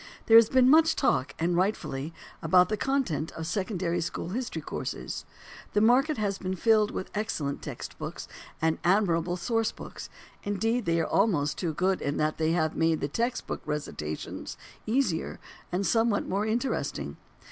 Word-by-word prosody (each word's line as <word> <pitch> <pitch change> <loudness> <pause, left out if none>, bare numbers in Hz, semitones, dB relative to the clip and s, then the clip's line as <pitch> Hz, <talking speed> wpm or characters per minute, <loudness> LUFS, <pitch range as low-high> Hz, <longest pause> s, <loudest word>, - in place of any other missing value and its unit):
There 225 - +6
has 230 -1 +7
been 255 -1 +5
much 320 +3 +6
talk, 140 - +1
and 170 +2 +1
rightfully, 170 -6 -1 0.3
about 180 +2 +4
the 215 - +1
content 215 - -1
of 160 - -5
secondary 180 -2 -1
school 165 - -4
history 240 +6 -3
courses. - - -5 0.5
The 210 - +3
market 260 +7 +4
has 200 -2 -1
been 190 0 -3
filled 215 +2 +3
with 190 - -5
excellent 155 -10 -2
text - - -7
books - - -6 0.3
and 160 0 +1
admirable 175 -2 +2
source 225 +4 0
books - - -9 0.3
indeed 225 +4 0
they 165 0 +2
are 165 - +1
almost 170 -9 +1
too 165 -4 -2
good 185 +3 +1
in 145 +1 -1
that 155 +1 0
they 160 0 +2
have 160 -2 +1
made 160 -3 +1
text 235 +2 -1
book - - -4
recitations 80 - -5 0.3
easier 220 -8 0 0.3
and 185 +3 0
somewhat 225 -1 +2
more 200 +3 0
interesting. 240 +5 -2
190 Hz, 160 wpm, -28 LUFS, 165-225 Hz, 0.5 s, has